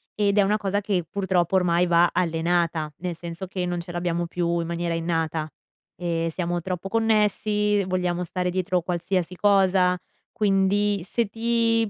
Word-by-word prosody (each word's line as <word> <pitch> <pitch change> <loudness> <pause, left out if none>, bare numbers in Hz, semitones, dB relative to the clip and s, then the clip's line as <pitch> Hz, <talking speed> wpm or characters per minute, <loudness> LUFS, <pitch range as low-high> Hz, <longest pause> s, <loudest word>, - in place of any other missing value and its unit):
Ed 205 -1 +1
è - - +7
una 210 +2 +2
cosa 200 -1 -1
che 190 -4 0
purtroppo 190 -2 0
ormai 180 -1 +3
va 170 0 +4
allenata, 165 -2 0
nel 175 -1 -4
senso 170 +2 -7
che 180 -1 -3
non 175 0 -2
ce 175 - -9
l'abbiamo 175 -1 -1
più 170 0 -1
in 165 - -3
maniera 170 0 -2
innata 165 -2 -1 0.5
e 165 -1 -1
siamo 175 -1 -2
troppo 185 +1 -4
connessi, 210 -2 +2
vogliamo 180 -1 -1
stare 180 +1 -2
dietro 180 -1 0
qualsiasi 180 +1 -2
cosa, 190 -2 +3 0.3
quindi 200 -1 +1
se 235 +4 0
ti 230 0 +1
180 Hz, 155 wpm, -24 LUFS, 170-200 Hz, 0.5 s, è